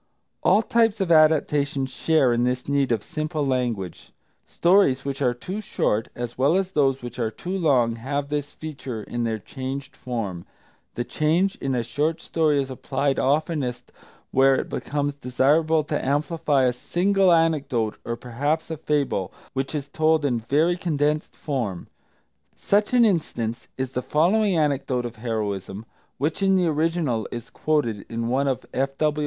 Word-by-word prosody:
All 220 - +4
types 225 -1 +2
of 190 -3 0
adaptation 150 -3 +3
share 135 0 +2
in 120 0 +1
this 125 0 -1
need 140 -2 +1
of 110 -3 0
simple 155 -1 -3
language, 120 -9 -2 0.4
stories 170 -8 +3
which 140 0 -3
are 125 -2 +2
too 185 - -5
short, 110 - 0
as 120 0 -6
well 145 +7 +4
as 190 -1 -1
those 135 -5 +1
which 120 0 -7
are 115 -2 0
too 180 +11 -5
long, 130 -10 +2
have 140 +4 -3
this 145 -1 -2
feature 135 -8 -6
in 120 +2 -3
their 110 -1 -1
changed 135 +5 -6
form. 105 -9 -4 0.5
The 120 - -1
change 165 +9 +1
in 135 -1 -2
a 120 - 0
short 150 +7 -1
story 155 -3 +1
is 135 -1 -2
applied 135 +1 -1
oftenest 145 -3 -1 0.4
where 135 +1 +5
it - - -2
becomes 145 0 -2
desirable 145 +4 +2
to 150 0 -2
amplify 145 0 +1
a 125 -1 +3
single 190 +8 +2
anecdote, 140 -9 +1
or 115 - -3
perhaps 145 +8 -2
a 160 - -3
fable, 140 - -1 0.2
which 135 +3 -2
is 145 -2 -3
told 155 +1 +2
in 125 -4 +1
very 155 +9 +1
condensed 150 -3 -1
form. 120 - -3 0.7
Such 210 +4 +1
an 240 -1 +6
instance 120 - -1
is 130 -1 -2
the 125 - -2
following 180 - +2
anecdote 140 -5 0
of 115 -2 -7
heroism, 105 -3 -3 0.3
which 150 +7 -1
in 195 -1 +4
the 185 -1 +3
original 155 - 0
is 120 -2 -7
quoted 120 -10 0
in 115 0 -2
one 135 +3 +1
of 130 -4 -1
F.W. 135 +3 0
140 Hz, 160 wpm, -24 LUFS, 125-155 Hz, 0.7 s, an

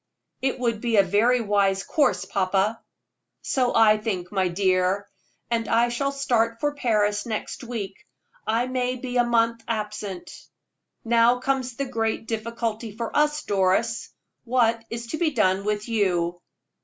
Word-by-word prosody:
"It 265 0 0
would 230 -3 -1
be 235 -3 +1
a 200 - +7
very 225 +6 +3
wise 200 -2 +1
course, 275 - +1
papa." 195 +3 0 0.6
"So 255 -3 0
I 215 -1 +6
think, 190 -5 -3
my 190 -2 +1
dear, 185 +2 +1 0.4
and 230 -1 0
I 235 +1 +3
shall 275 +4 -1
start 230 -4 0
for 290 +2 0
Paris 210 -6 +1
next 220 +3 -4
week. 215 -5 -6 0.4
I 225 +3 +1
may 255 0 -1
be 250 0 -4
a 245 - +5
month 230 -1 +1
absent. 210 -4 -4 0.7
Now 235 +1 +4
comes 255 -1 -1
the 275 - -2
great 225 -3 -2
difficulty 225 -1 -3
of 220 - -10
all, 300 0 +4 0.2
Doris 200 +4 +1 0.3
what 230 -2 +2
is 235 0 -5
to 315 - -3
be 340 -2 +2
done 200 -7 +1
with 210 +1 -1
you?" 175 -6 0
225 Hz, 150 wpm, -24 LUFS, 205-245 Hz, 0.7 s, a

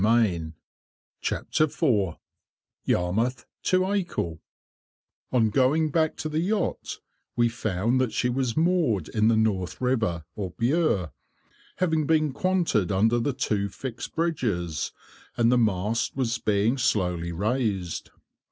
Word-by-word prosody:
[Picture: 100 -8 +2 1.0
Decorative 155 -2 +2
drop 105 - +1 0.7
capital] 125 - 0 0.9
On 115 -4 +3
going 145 +6 +2
back 160 +1 +1
to - - -3
the 155 0 -1
yacht, 200 +3 -1 0.4
we 120 -1 +3
found 115 +1 0
that 125 -3 0
she 125 - 0
was 125 -1 -1
moored 160 - +2
in 110 -1 +2
the 115 -1 +4
North 100 -5 0
River, 110 -11 0
or 95 -5 -5
Bure, 120 - +1 0.6
having 160 -5 +1
been 155 -3 +2
quanted 175 - +1
under 110 +5 +3
the 135 +4 0
two 105 -6 -1
fixed 115 +5 -7
bridges, 105 - -1 0.5
and 115 0 +4
the 125 - +4
mast 105 0 0
was 120 -3 -1
being 105 +5 +1
slowly 90 -7 0
raised. 100 -2 -1
115 Hz, 120 wpm, -26 LUFS, 100-145 Hz, 1.0 s, the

